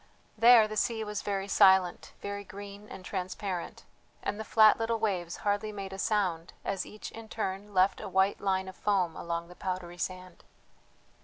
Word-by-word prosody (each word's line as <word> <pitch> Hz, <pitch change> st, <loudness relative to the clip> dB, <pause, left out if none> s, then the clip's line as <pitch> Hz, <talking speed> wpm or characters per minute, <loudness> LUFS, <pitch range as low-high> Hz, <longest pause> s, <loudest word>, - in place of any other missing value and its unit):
There 230 Hz, 0 st, +7 dB
the 215 Hz, 0 st, -5 dB
sea 225 Hz, 0 st, 0 dB
was 210 Hz, -1 st, -4 dB
very 195 Hz, -1 st, -2 dB
silent, 190 Hz, -3 st, +4 dB
very 200 Hz, 0 st, -4 dB
green 200 Hz, +1 st, -10 dB
and 185 Hz, -, -10 dB
transparent, 185 Hz, -1 st, -4 dB, 0.4 s
and 205 Hz, -, -2 dB
the -, -, -3 dB
flat 215 Hz, 0 st, +6 dB
little 225 Hz, 0 st, 0 dB
waves 185 Hz, -6 st, -1 dB
hardly 205 Hz, +1 st, 0 dB
made 195 Hz, -2 st, -6 dB
a 195 Hz, -, -7 dB
sound 185 Hz, -6 st, 0 dB
as 195 Hz, -2 st, -2 dB
each 210 Hz, -, -8 dB
in 225 Hz, -1 st, -10 dB
turn 205 Hz, -1 st, -4 dB
left 185 Hz, +1 st, +3 dB
a -, -, -6 dB
white 190 Hz, +2 st, +2 dB
line 190 Hz, -1 st, 0 dB
of 190 Hz, -, -8 dB
foam 185 Hz, -5 st, +1 dB
along 170 Hz, 0 st, -4 dB
the 180 Hz, -, -13 dB
powdery 180 Hz, -2 st, -5 dB
sand. 185 Hz, 0 st, -5 dB
195 Hz, 175 wpm, -30 LUFS, 185-210 Hz, 0.4 s, There